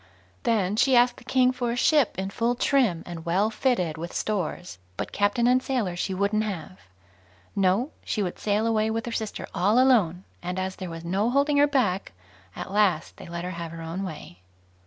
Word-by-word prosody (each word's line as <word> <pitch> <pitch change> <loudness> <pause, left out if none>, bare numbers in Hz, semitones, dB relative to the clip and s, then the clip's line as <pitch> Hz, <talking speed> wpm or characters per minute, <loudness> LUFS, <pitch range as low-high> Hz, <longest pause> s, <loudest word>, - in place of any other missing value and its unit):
Then 210 -3 +1
she 255 +2 +4
asked 245 0 +4
the - - -14
King 255 -1 +3
for 250 -1 -2
a 235 - -1
ship 275 -1 +3
in 190 +1 -3
full 235 +4 0
trim, 240 -10 +2
and 170 -2 -7
well 190 +6 +1
fitted 200 - 0
with 170 +1 -6
stores; 180 - -3 0.2
but - - -4
captain 205 +4 +1
and 250 +1 +4
sailors 220 -11 -2
she 190 - -1
wouldn't 200 +3 +1
have. 190 -3 -6 0.8
No; 200 +8 +2
she 210 - -1
would 180 - -4
sail 210 +1 +1
away 220 -1 +2
with 225 +1 -2
her 240 - -4
sister 220 -2 -4
all 205 +6 +2
alone; 205 -10 +3 0.2
and 180 +1 -4
as 190 0 -2
there 185 -2 -6
was 165 0 -8
no 195 +6 +1
holding 280 +3 +2
her 290 +1 +6
back, 210 -10 0 0.4
at - - -6
last 195 -6 +1
they - - -10
let 170 0 -5
her 180 - -4
have 170 -2 -6
her 165 0 -8
own 165 +4 -4
way. 155 - -7
205 Hz, 200 wpm, -26 LUFS, 180-240 Hz, 0.8 s, her